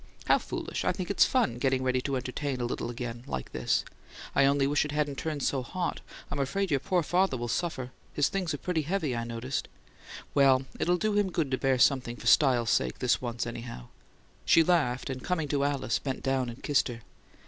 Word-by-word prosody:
"How - - +4
foolish! - - -4
I - - +2
think 185 0 -3
it's - - +5
fun, 125 - +1
getting 130 0 +1
ready 130 0 +1
to 140 +1 -2
entertain 130 +1 -3
a 120 - -1
little 120 0 -3
again, 120 0 -5
like 65 -1 -4
this. - - 0 0.5
I 140 - +5
only 140 0 +3
wish 145 +1 +2
it 150 - -4
hadn't 150 -2 -1
turned 150 -4 -3
so 135 - +1
hot: 175 +8 -3 0.3
I'm - - -2
afraid 190 +7 -1
your 140 - +3
poor 175 +6 +1
father'll 165 -8 +1
suffer 130 -1 -2 0.2
his 145 - +2
things 185 -4 -2
are 145 - -2
pretty 165 +1 -1
heavy, 155 -4 -1
I 115 - -2
noticed. 120 +3 -3 0.7
Well, 135 -2 +5
it'll 175 +1 +2
do 215 +3 0
him 205 -2 +2
good 155 -6 -1
to 130 - +1
bear 135 -1 +2
something 125 -2 +3
for - - -11
style's 125 -5 +4
sake 65 -1 +1
this 125 - +1
once, 120 -1 -3
anyhow!" 115 - -7 0.5
She 165 - +6
laughed, 145 -7 +1
and 130 -1 -6
coming 165 -4 -1
to 140 -1 +1
Alice, 140 -5 0
bent 135 -2 -4
down 135 -2 0
and 120 - -10
kissed 145 -2 +2
her. 120 -2 -7
135 Hz, 210 wpm, -29 LUFS, 125-155 Hz, 0.7 s, She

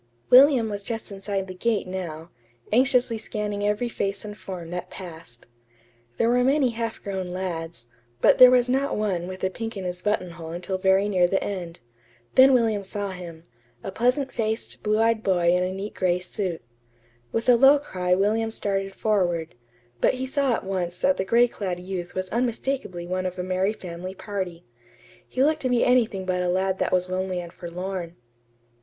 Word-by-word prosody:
William 255 -2 +7
was 205 -1 -4
just 225 +1 -5
inside 195 0 -3
the 185 - -8
gate 220 +3 0
now, 175 -3 -6 0.4
anxiously 250 -2 +3
scanning 210 -1 -3
every 210 +4 0
face 200 -3 -3
and 210 0 -7
form 180 -5 -8
that 180 0 -5
passed. 165 -10 -10 0.7
There 230 - +2
were 245 +1 +3
many 270 -1 +3
half 230 -1 -4
grown 190 -2 -3
lads, 170 -7 -5 0.3
but - - +4
there 255 0 +11
was 250 -1 +4
not 270 +3 0
one 190 -5 -1
with 185 0 -8
a 190 - +1
pink 225 +1 -5
in 195 - -5
his 180 0 -4
buttonhole 180 -5 -2
until 185 +2 -3
very 190 +1 +3
near 185 -3 +3
the 195 +2 0
end. 175 -6 -5 0.5
Then 265 +1 +7
William 225 -5 +2
saw 200 0 -4
him 170 -3 -9 0.4
a 195 - -4
pleasant 250 +6 +1
faced, 220 -1 -3
blue 215 0 +1
eyed 225 0 +2
boy 175 -4 +2
in 180 - +2
a 185 - -1
neat 195 +2 -5
gray 180 -2 +1
suit. 180 - -4 0.7
With 230 - -2
a 250 - +7
low 270 +4 +7
cry 180 -10 -1
William 215 +4 +1
started 195 -3 -1
forward; 175 -6 0 0.5
but - - +3
he 260 +1 -3
saw 270 -2 +1
at - - -5
once 180 -2 -3
that 280 0 +3
the 190 - -1
gray 235 +4 +4
clad 185 -6 -4
youth 180 -1 -6
was 185 0 -2
unmistakably 235 -6 -2
one 185 +1 -2
of 185 - -6
a 180 - -2
merry 185 +3 0
family 185 -1 -7
party. 185 -5 -5 0.6
He 260 - 0
looked 310 +2 +2
to 255 - 0
be 245 -1 +3
anything 230 -6 +2
but 180 -1 0
a 180 - 0
lad 190 +1 0
that - - 0
was 180 0 +2
lonely 185 0 -2
and 170 -1 -8
forlorn. 175 0 -5
195 Hz, 185 wpm, -25 LUFS, 180-230 Hz, 0.7 s, there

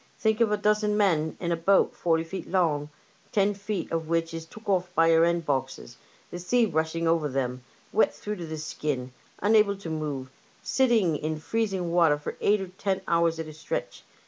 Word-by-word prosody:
Think 220 +1 +1
of 225 -2 +4
a 210 - +2
dozen 210 0 +1
men 165 -7 +1
in 170 -1 -2
a - - +2
boat 190 +4 +3
forty 165 -1 +1
feet 185 +3 -7
long, 155 -6 +1 0.4
ten 205 -1 +2
foot 200 -2 -4
of 165 -1 -2
which 165 0 0
is 165 0 -6
took 215 +6 -13
oflf 190 -4 +1
by 165 +1 +5
her 165 0 +5
end 170 -1 0
boxes, 135 -3 -3 0.4
the 175 - -5
sea 235 +7 +2
rushing 160 -2 -1
over 165 -2 +2
them, 125 -2 -2 0.3
wet 220 - +4
through 210 0 -6
to 170 -2 -6
the 160 0 -5
skin, 145 -4 -3 0.3
unable 210 -1 +4
to 175 -5 -7
move, 145 -4 -4 0.3
sitting 230 - +2
in 155 +1 -3
freezing 195 -2 -1
water 165 -4 +4
for 145 - -6
eight 205 +1 +3
or 190 - -5
ten 190 +1 -2
hours 170 -1 +2
at 160 - -4
a 155 - -9
stretch. 155 - -5
170 Hz, 200 wpm, -27 LUFS, 160-200 Hz, 0.4 s, by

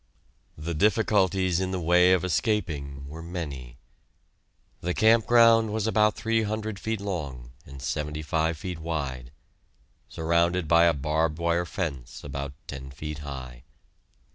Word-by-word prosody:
The 80 +3 -4
difficulties 95 -2 +2
in 95 0 -1
the 95 -1 -2
way 90 +2 +5
of 95 -1 +3
escaping 80 - -1
were 80 +3 -8
many. 70 -8 -6 1.0
The 90 +1 -2
camp 110 0 +4
ground 115 -2 +6
was 110 -1 -1
about 105 -1 +3
three 115 0 +1
hundred 110 -1 -3
feet 110 0 -2
long 70 -12 -5 0.2
and 70 -1 -10
seventy 75 +3 -3
five 80 +1 0
feet 90 +1 -5
wide, 70 -7 -4 0.8
surrounded 85 +1 +1
by 85 +2 +6
a 85 - +4
barbed 75 +2 0
wire 85 +1 0
fence 70 - -5
about 70 0 -5
ten 65 -1 -7
feet 75 +3 -6
high. 65 -4 -8
85 Hz, 140 wpm, -27 LUFS, 70-95 Hz, 1.0 s, ground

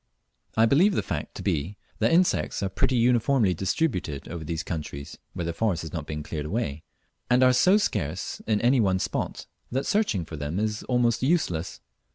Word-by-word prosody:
I 110 - +6
believe 175 - +4
the - - 0
fact - - -4
to - - -6
be 85 +8 -1 0.2
that - - +3
insects 175 - +2
are 95 - 0
pretty 110 +7 +1
uniformly 120 -3 +3
distributed 90 - -1
over 85 -1 -5
these 80 +1 -3
countries 75 -4 -6
(where 85 - -3
the 85 - -2
forests 90 -3 0
have 80 - -8
not 80 -4 -4
been 75 -1 -4
cleared 75 -1 -4
away), 80 -7 -2 0.5
and 125 +1 +5
are 130 0 +6
so 185 +10 +5
scarce 90 - -2
in 110 -2 +2
any 125 +2 +4
one 95 -4 +3
spot - - -3 0.3
that 135 +3 -1
searching 200 - +1
for 80 - -8
them 75 +6 -3
is 105 0 -1
almost 120 -2 +2
useless. 100 - 0
100 Hz, 190 wpm, -26 LUFS, 80-125 Hz, 0.5 s, I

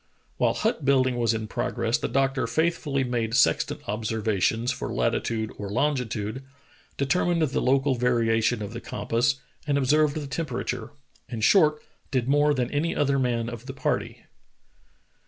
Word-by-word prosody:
While - - +2
hut 220 -8 -1
building 130 -2 +3
was 115 -2 +2
in 110 -1 -4
prog 125 +2 -3
ress 115 0 +1
the - - -2
doctor 135 -2 +1
faithfully 150 0 0
made 120 -2 -1
sextant - - +2
observations 110 +2 0
for 125 - -4
latitude 110 -1 -1
or 100 -1 -4
longitude, 125 -2 -1 0.5
determined 170 +4 +1
the 145 -3 0
local 135 +1 +2
variation 115 -3 +1
of 105 +2 -6
the 120 - -6
compass, 115 +4 0 0.3
and 140 -1 +2
observed 145 +2 +3
the 155 -2 -3
temperature 130 -5 -3 0.2
— - - -34
in 115 -3 -5
short, 155 - +4 0.3
did 130 -3 0
more 145 +1 +3
than 125 -2 -1
an}^ 155 +4 -1
other 140 -1 +2
man 120 -3 0
of 120 +1 -7
the 135 - -5
party. 135 -1 -2
125 Hz, 155 wpm, -26 LUFS, 115-140 Hz, 0.5 s, short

